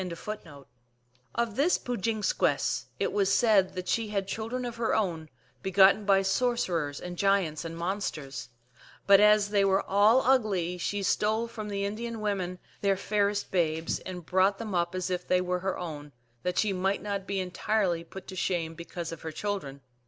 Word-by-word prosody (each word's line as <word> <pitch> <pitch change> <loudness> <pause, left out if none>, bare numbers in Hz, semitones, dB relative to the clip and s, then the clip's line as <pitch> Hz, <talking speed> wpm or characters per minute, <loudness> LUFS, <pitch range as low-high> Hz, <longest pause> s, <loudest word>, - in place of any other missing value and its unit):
1 185 +4 -5 1.0
Of 235 -3 -1
this 305 +8 +3
Pook 245 -4 -4
jin 220 0 -1
skwess 140 -7 +1
it - - 0
was 200 -1 +2
said 200 -2 +3
that 185 0 -5
she 225 +3 0
had 200 -2 -2
children 225 +5 -3
of 240 -1 -5
her 230 -1 +1
own, 170 -7 -1 0.3
begotten 195 +2 +5
by 195 -1 +4
sorcerers 190 - 0
and 175 -1 -7
giants 195 -6 +2
and 165 0 -6
monsters; 155 -8 -4 0.6
but 200 -1 +7
as 210 0 +5
they 205 -1 +3
were 195 0 +3
all 210 +6 +4
ugly 200 -9 +1
she 205 +3 -2
stole 215 +4 +1
from 220 -2 -7
the 200 -1 -2
Indian 225 +3 -4
women 190 -4 -2 0.2
their 195 -1 +2
fairest 205 0 0
babes, 160 -3 0
and 180 -3 -8
brought 190 +3 +3
them 215 -2 -5
up 170 0 0
as 185 0 -2
if 180 0 -3
they 180 - +3
were 180 0 -1
her 190 +1 -2
own, 150 -4 -7 0.3
that 180 +4 -2
she 210 -2 +2
might 190 +1 0
not 200 -2 -3
be 195 -1 -1
entirely 185 -1 0
put 190 +3 -10
to 185 - -8
shame 170 -3 -1
because 170 0 -6
of 165 - -8
her 160 - -5
children. 155 -7 -4
195 Hz, 180 wpm, -28 LUFS, 175-210 Hz, 1.0 s, but